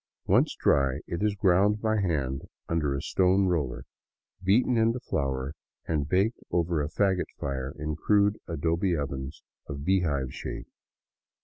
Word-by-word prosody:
Once - - +3
dry, 70 -2 +3
it 85 - -4
is 105 -1 +1
ground 100 +2 +3
by 110 -1 +1
hand 70 -7 -1 0.2
under 75 -4 0
a 70 - -4
stone 95 +1 +3
roller, 75 -9 -1 0.6
beaten 110 +6 +3
into 115 +2 +2
flour, 70 - -2 0.3
and 75 -3 -1
baked 100 +5 +2
over 85 -2 +1
a 75 - -2
fagot 95 +2 +1
fire 65 -1 -3
in 75 0 -3
crude 105 +5 +2
adobe 85 +2 0
ovens 70 -1 -5 0.2
of 70 -1 -6
bee 95 +1 +3
hive 70 -6 -1
shape. - - -6
85 Hz, 145 wpm, -28 LUFS, 70-100 Hz, 0.6 s, Once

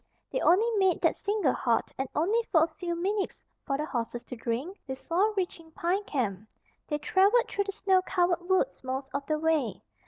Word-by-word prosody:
They - - -1
only 380 +6 +5
made 380 -2 +3
that - - +3
single 405 -10 +1
halt 235 -2 0
(and 265 -1 -3
only 405 +10 +2
for 320 -2 +6
a - - +2
few 345 +1 -4
minutes 390 +4 -1 0.3
for 275 - 0
the 300 - -2
horses 240 -3 -3
to 250 - -8
drink) 250 - -3
before 335 +10 0
reaching 350 -4 -3
Pine 365 +6 0
Camp. 215 - -2 0.4
They 295 - -1
traveled 390 +10 +3
through 405 - -1
the 395 - -3
snow 385 -2 +2
covered 355 -1 0
woods 375 - +1
most 265 +1 -4
of 280 0 -2
the 310 - +1
way. 305 - 0
335 Hz, 190 wpm, -29 LUFS, 270-385 Hz, 0.4 s, for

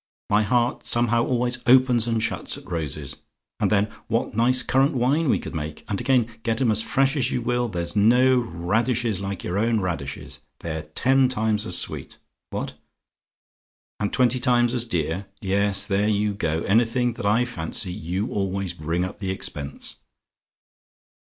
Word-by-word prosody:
My 105 +1 +5
heart 120 +3 +1
somehow 120 0 +2
always 125 0 0
opens 125 -2 +5
and 115 -1 0
shuts 115 - -1
at - - -13
roses. 75 -4 -4 0.4
And - - +2
then 105 0 +2 0.2
what - - -1
nice 125 +3 +4
currant 135 +3 +2
wine 135 +5 +2
we - - +3
could - - -7
make! 75 -1 -5
And 100 +1 -2
again, 125 -1 +3 0.2
get 115 0 -1
'em 125 -4 +3
as 110 0 +1
fresh 135 +4 +1
as 130 -3 +1
you 125 - -2
will, 120 0 0
there's 85 -1 -3
no 125 +5 +5
radishes 110 +3 -1
like 100 -1 -5
your 90 +3 -1
own 115 0 +2
radishes! 85 -8 -4 0.2
They're 80 -1 -4
ten 130 - +2
times 110 -3 0
as 90 - +3
sweet! - - -3 0.3
What? - - -4 1.3
"AND 105 -1 -1
TWENTY 125 0 +3
TIMES 120 -1 +2
AS 120 -2 0
DEAR? 90 -1 -2
"Yes; 100 0 +1
there 100 +1 +1
you 105 0 +1
go! 80 -5 -1
Anything 120 +3 +2
that 105 - -7
I 115 +4 +3
fancy, 90 -4 -3
you 90 +5 -3
always 95 -2 -2
bring 85 +2 -2
up 95 +3 -8
the 95 -3 -3
expense. 75 -6 -4
110 Hz, 165 wpm, -24 LUFS, 95-120 Hz, 1.3 s, My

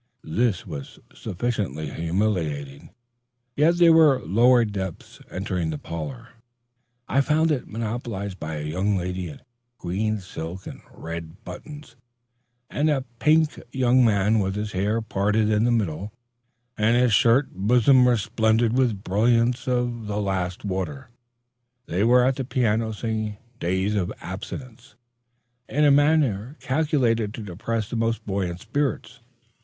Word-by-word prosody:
This 115 -2 +1
was 75 -7 -8 0.2
sufficiently 90 - -3
humiliating, 80 -6 -2 0.7
yet 160 +4 +4
were 160 -5 +6
there - - -11
lower 120 +5 +5
depths. 95 -4 -6
Entering 90 -3 -2
the 80 - -3
parlor, 95 - -7 0.8
I 140 - +3
found 155 +3 +2
it 140 -4 -1
monopolized 110 -3 -4
by 80 0 -4
a 75 - -4
young 95 +6 0
lady 90 -1 -3
in 75 - -11 0.4
green 105 +3 -2
silk 90 0 -7
and - - -9
red 85 +1 -7
ribbons, 150 -5 -10 0.7
and 150 +2 0
a 135 -3 0
pink 155 +1 +3
young 130 -1 +3
man 105 -1 +3
with 95 -1 -1
his 105 0 -3
hair 105 +4 0
parted 105 +1 +1
in 105 +1 +2
the 120 - +2
middle 100 -3 -1 0.7
and 115 +3 +3
his 125 -2 +3
shirt 120 +7 +4
bosom 125 +6 +4
resplendent 115 0 +2
with 120 -6 +1
brilliants 115 +6 +2
of 120 -3 -1
the 105 0 -2
last 95 -2 -2
water. 110 +7 -4 0.8
They 90 +4 -1
were 125 +2 +5
at 130 0 +1
the 135 - -2
piano, 115 -3 0
singing 110 -1 -3 0.2
"Days 95 +4 0
of 100 -4 -1
Absence" 130 +1 -8 0.7
in 150 +2 +2
a 145 - +6
manner 145 -4 +2
calculated 125 -6 0
to 115 - -7
depress 105 +3 -3
the - - -3
most 115 0 -1
buoyant 95 -3 -2
spirits. 125 0 -2
110 Hz, 140 wpm, -24 LUFS, 95-125 Hz, 0.8 s, were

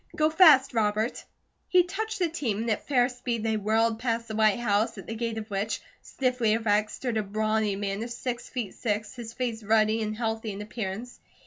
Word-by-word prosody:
"Go 310 0 +2
fast, 305 -6 +7
Robert." 215 0 0 0.5
He 360 -1 +6
touched 425 +5 -4
the 360 -3 +2
team 280 -11 -2
and 225 +1 -1
at 215 - -2
fair 250 -4 +4
speed 245 -3 -3
they 220 -1 +1
whirled 220 +2 +1
past 230 -1 -1
the 220 - -5
white 215 -2 +4
house, 215 -2 +1
at 195 - -8
the 225 - -5
gate 230 0 -3
of 215 -1 -5
which, 200 +2 -1 0.2
stiffly 250 -4 0
erect, 215 -1 +2
stood 245 -1 -3
a - - +2
brawny 215 0 0
man 200 +1 -3
of 235 - -4
six 240 0 -4
feet 240 -6 -4
six, 210 -1 -2
his 230 -2 -8
face 235 -3 -3
ruddy 215 +1 +3
and 215 0 -3
healthy 225 -2 -2
in 200 - -6
appearance. 215 +2 -5
225 Hz, 205 wpm, -27 LUFS, 215-245 Hz, 0.5 s, fast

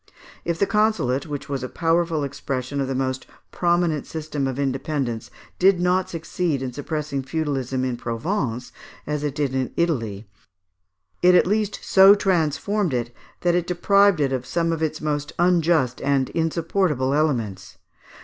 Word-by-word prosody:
If 170 -1 -1
the 200 - +2
consulate, 210 - +1
which 145 -2 -5
was 140 -2 -3
a 130 - -4
powerful 165 -2 +1
expression 140 0 -3
of 135 - -1
the 135 - -2
most 130 0 -2 0.2
prominent 170 -4 +1
system 150 -3 -3
of 130 -1 -3
independence, 135 -3 -2 0.3
did 185 0 +5
no 180 +1 +2
succeed 165 -3 -2
in 125 -1 -4
suppressing 145 0 -3
feudalism 135 -3 -2
in 125 -2 -2
Provence 125 - -3 0.3
as 150 0 -2
in 135 -3 -1
Italy, 115 - -1 0.9
it 180 0 +6
at - - +5
least 210 +1 -1
so 195 +1 +7
transformed 180 -1 0
it, 120 0 -3 0.3
that 175 -1 +2
it 175 0 0
deprived 200 +1 +3
it 135 -2 +1
of 130 -1 -3 0.3
its 155 -1 -2
most 150 -1 -2
unjust 170 -7 +2
and 135 -1 +1
insupportable 165 -4 0
elements. 110 -11 -1
150 Hz, 140 wpm, -23 LUFS, 130-175 Hz, 0.9 s, so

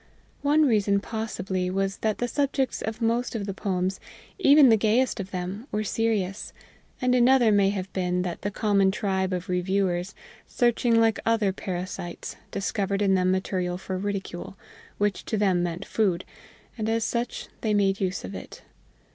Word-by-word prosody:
One 295 +2 +4
reason 205 -5 +3
possibly 195 -4 -3
was 195 +1 -1
that 215 -1 -1
the 245 - -1
subjects 275 0 0
of 220 +1 -4
most 235 +2 0
of 210 -3 -2
the 195 - -3
poems, 185 -1 -2 0.4
even 285 -5 +7
the 225 - +7
gayest 225 +3 +2
of 195 -1 -4
them, 190 +6 -5
were 210 +1 -1
serious, 210 -2 -1 0.5
and 250 -1 +2
another 250 -2 +5
may 200 -1 +4
have 195 -1 -4
been 180 -1 0
that 175 -2 -4
the 205 - -1
common 200 -1 +2
tribe 190 -1 -1
of 180 -1 -3
reviewers, 180 0 0 0.3
searching 240 -1 +2
like 225 -2 +3
other 220 -4 +2
parasites, 180 -2 -5
discovered 200 0 -1
in 195 -1 +3
them 185 -1 +2
material 185 -1 -1
for 190 0 -5
ridicule 195 -1 -4 0.4
which 205 -1 0
to 220 - -1
them 190 -4 +2
meant 175 +2 -3
food, 185 -5 0 0.5
and 215 0 -1
as 225 0 +1
such 235 +2 -2
they 215 -2 +1
made 195 -1 +2
use 185 0 -1
of - - -7
it. - - -9
200 Hz, 165 wpm, -26 LUFS, 185-225 Hz, 0.5 s, even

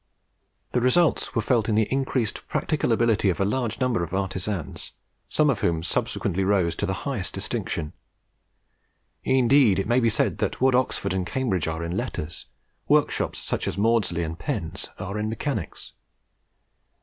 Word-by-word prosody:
The 125 - +1
results 155 +7 +2
were 115 - +1
felt 115 -1 +2
in 105 - +2
the 110 -1 +3
increased 130 -4 -1
practical 150 -6 0
ability 115 -3 +3
of 90 - -1
a 100 - +2
large 115 +2 -1
number 125 -8 +1
of 85 +2 -4
artisans, 95 -2 -3 0.4
some 155 - +3
of 135 -7 +2
whom 80 -1 0
subsequently 90 +2 -1
rose 95 -4 +2
to - - -1
the - - -4
highest - - -3
distinction. 75 -2 -3 1.3
Indeed 130 -5 +4
it 95 - 0
may 120 +2 +3
be 115 -2 +3
said 105 - 0
that - - -1
what 130 0 +4
Oxford 125 -6 +1
and 95 -1 0
Cambridge 110 - -1
are 80 0 -3
in 85 +1 -3
letters, 80 -3 -4 0.4
workshops - - +2
such - - -3
as - - -3
Maudslay's 100 -6 +2
and 80 +1 -6
Penn's - - -4
are 100 +3 -4
in 105 0 -1
mechanics. 110 - -4
105 Hz, 160 wpm, -25 LUFS, 90-125 Hz, 1.3 s, Indeed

